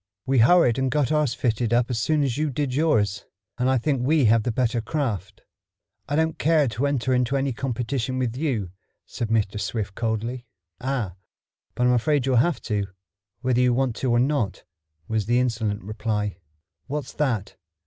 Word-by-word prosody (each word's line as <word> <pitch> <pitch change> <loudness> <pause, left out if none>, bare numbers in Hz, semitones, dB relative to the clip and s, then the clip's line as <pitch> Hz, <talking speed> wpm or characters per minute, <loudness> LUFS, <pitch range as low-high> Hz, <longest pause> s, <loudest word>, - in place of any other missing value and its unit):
We 135 -1 +2
hurried 125 -1 +5
and 130 0 +1
got 145 -1 +1
ours 150 -5 +1
fitted 115 -1 0
up 120 0 +4
almost 125 - -7
as 115 - -1
soon 155 +4 +2
as 130 -4 0
you 155 +1 0
did 140 -1 -2
yours, 110 -10 +1 0.3
and 125 +1 +2
I 130 - +3
think 135 +1 0
we 145 +1 +3
have 115 +1 +5
the 120 - -1
better 120 0 0
craft." 110 - -3 0.7
"I 145 - 0
don't 160 0 0
care 155 -2 +3
to 120 +6 -1
enter 130 -2 0
into 125 +2 +1
any 135 -1 0
competition 130 +1 -2
with 125 -2 -1
you," 125 - -2 0.3
said 115 - -4
Mr. 105 -2 0
Swift 105 -4 -3
coldly. 115 +3 -3 0.3
"Ah, 125 -7 -2 0.6
but 125 - +1
I'm 125 - +4
afraid 135 +3 +2
you'll 130 -2 +2
have 155 +7 +2
to, 105 -3 -1 0.5
whether 125 -1 +2
you 125 -1 +3
want 130 -3 0
to 130 - -1
or 120 - +3
not," 120 -8 0 0.4
was 110 -2 -1
the 120 +1 +3
insolent 115 -5 -1
reply. 105 -2 -3 0.5
"What's 145 -2 -4
that? 120 -9 -1
125 Hz, 185 wpm, -24 LUFS, 110-135 Hz, 0.7 s, hurried